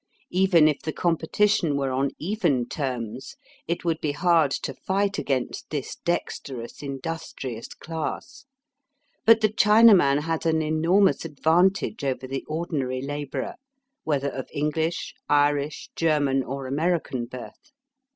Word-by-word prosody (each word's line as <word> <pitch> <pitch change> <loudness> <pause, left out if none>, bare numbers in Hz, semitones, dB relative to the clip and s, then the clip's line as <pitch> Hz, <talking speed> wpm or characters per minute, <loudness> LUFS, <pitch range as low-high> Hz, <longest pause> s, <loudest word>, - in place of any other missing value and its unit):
Even 180 -4 +5
if 150 -2 +1
the 155 - -3
competition 170 0 +1
were 135 -1 -1
on 135 +2 +1
even 165 - 0
terms, 125 -3 -4 0.3
it 170 +1 -2
would 165 -2 0
be 150 -2 -1
hard 165 -2 +3
to - - -3
fight 200 +1 -1
against 130 -3 -2
this 145 -4 -4
dexterous 135 -8 -4
industrious 140 -4 -5
class. 170 - -6 0.8
But 225 0 +7
the 215 - +4
Chinaman 210 -9 +6
has 165 +1 -2
an 160 -1 +2
enormous 170 +6 +3
advantage 165 +5 +1
over 130 -1 -2
the 135 +1 -4
ordinary 145 -6 -2
labourer, 145 0 -4 0.5
whether 140 -2 0
of 130 -2 -6
EngKsh, 160 +3 -1 0.2
Irish, 145 0 +1
German, 145 -4 +2
or 135 +1 -5
American 145 -3 -1
birth. 125 - -11
155 Hz, 125 wpm, -25 LUFS, 135-175 Hz, 0.8 s, But